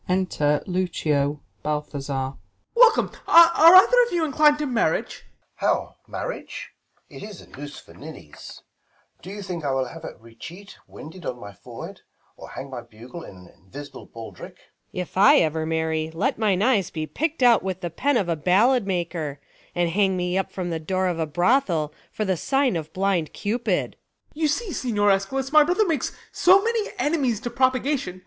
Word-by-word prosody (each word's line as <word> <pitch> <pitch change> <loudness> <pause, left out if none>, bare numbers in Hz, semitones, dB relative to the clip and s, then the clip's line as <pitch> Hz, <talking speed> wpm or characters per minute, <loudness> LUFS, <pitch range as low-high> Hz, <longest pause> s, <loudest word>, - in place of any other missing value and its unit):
Enter 165 -6 0
Lucio, 150 -6 -1 0.2
Balthazar. 140 -3 -3
Ben. - - -20 0.3
Welcome! 470 -2 +5 0.2
are 335 0 +8
either - - +6
of - - -9
you 345 -2 0
inclin'd 295 0 +4
to 300 - -2
marriage? 245 -4 -1 0.4
Bal, - - 0
How, - - -24
marriage - - -6 0.4
1 - - -11
it - - -8
is 205 -3 -9
a - - -16
noose 145 +1 -10
for - - -17
ninnies; 150 - -12 0.6
Do 185 - -10
you 200 +1 -7
think 175 -4 -5
I 145 - -1
will 135 -1 0
have 165 +5 -10
a - - -8
recheat 160 - -12
winded 165 +4 -11
In 125 - -5
my 100 -2 -10
forehead, - - -10 0.3
or - - -12
hang 135 0 -8
my 125 -2 -6
bugle 120 +8 -12
in 100 - -11
An 90 -1 -16
invisible 140 +7 -11
baldrick 115 -1 -10 0.3
1 - - -7
Luc. - - -1
If - - -14
I 275 +10 +7
ever 160 - 0
marry, 160 -1 -1
let 190 +4 -1
mine 205 -3 +1
eyes 220 -7 +2
be 155 -1 -4
Pickt 310 - -2
out 240 -3 +6
with 190 -1 -4
the 175 -2 -4
pen 280 - +1
of 195 - 0
a 170 - 0
ballad 200 - +2
maker, 170 -6 -3 0.4
And 175 -1 0
hang 190 0 +1
me 180 0 -2
up 195 +1 -3
at 180 -2 -3
the 165 - -2
door 185 +3 -1
of 170 -2 -3
a 160 - -1
brothel, 175 - +1 0.2
For 215 - -3
the 190 -2 0
sign 270 - +1
of 160 -2 -5
blind 190 -4 -1
cupid. 230 +4 -1
Ben. - - -34
You 310 - +3
see, 375 +5 -2
Signior 205 -5 +1
Eschalus, 265 +8 -1
my 305 0 +7
brother 360 +7 +1
makes 315 -8 -1 0.2
So 380 +2 +5
many 455 -2 -1
enemies 285 - 0
to 240 - -5
propagation. 255 -6 0
185 Hz, 190 wpm, -23 LUFS, 155-260 Hz, 0.6 s, are